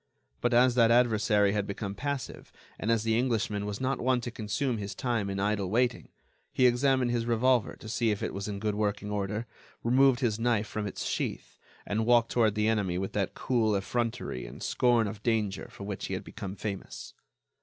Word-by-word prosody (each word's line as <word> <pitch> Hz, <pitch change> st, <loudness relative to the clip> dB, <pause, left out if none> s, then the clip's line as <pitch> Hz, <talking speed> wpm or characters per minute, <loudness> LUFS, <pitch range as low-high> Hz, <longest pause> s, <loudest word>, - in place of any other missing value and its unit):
But 120 Hz, -, +1 dB
as 125 Hz, +1 st, +5 dB
that 115 Hz, -2 st, +5 dB
adversary 110 Hz, -4 st, +3 dB
had 105 Hz, -1 st, -1 dB
become 100 Hz, 0 st, -4 dB
passive, 140 Hz, +5 st, -5 dB, 0.3 s
and 110 Hz, -, -2 dB
as 115 Hz, -2 st, +2 dB
the 110 Hz, 0 st, +1 dB
Englishman 110 Hz, -4 st, 0 dB
was 105 Hz, 0 st, -4 dB
not 130 Hz, +1 st, -1 dB
one 130 Hz, 0 st, +2 dB
to 120 Hz, -, -5 dB
consume 115 Hz, +3 st, -2 dB
his 100 Hz, -1 st, -5 dB
time 115 Hz, -6 st, -1 dB
in 95 Hz, 0 st, -3 dB
idle 100 Hz, -1 st, 0 dB
waiting, 120 Hz, +3 st, 0 dB, 0.4 s
he 130 Hz, -, +3 dB
examined 125 Hz, 0 st, +3 dB
his 120 Hz, -1 st, -1 dB
revolver 120 Hz, 0 st, +2 dB
to -, -, -12 dB
see 115 Hz, +1 st, 0 dB
if 105 Hz, -2 st, -1 dB
it -, -, -2 dB
was 100 Hz, +1 st, -4 dB
in 100 Hz, -1 st, -4 dB
good 105 Hz, +1 st, -1 dB
working 105 Hz, 0 st, -2 dB
order, 105 Hz, +2 st, -2 dB, 0.4 s
remove 130 Hz, +2 st, +4 dB
his 115 Hz, -4 st, 0 dB
knife 115 Hz, -2 st, +1 dB
from 105 Hz, 0 st, -4 dB
its -, -, -5 dB
sheath, -, -, -3 dB, 0.3 s
and 110 Hz, +2 st, -1 dB
walked 120 Hz, -1 st, +4 dB
toward 110 Hz, -3 st, +2 dB
the 105 Hz, 0 st, +1 dB
enemy 100 Hz, -5 st, +1 dB
with 95 Hz, +1 st, -3 dB
that 100 Hz, -3 st, -1 dB
cool 115 Hz, -5 st, +1 dB
effrontery 115 Hz, -, -2 dB
and -, -, -9 dB
scorn 120 Hz, -2 st, +3 dB
of 100 Hz, 0 st, -7 dB
danger 110 Hz, -4 st, -1 dB
for -, -, -10 dB
which 100 Hz, -1 st, -4 dB
he -, -, -2 dB
had -, -, -5 dB
become 95 Hz, 0 st, -7 dB
famous. 100 Hz, -2 st, -6 dB
110 Hz, 200 wpm, -29 LUFS, 105-120 Hz, 0.4 s, as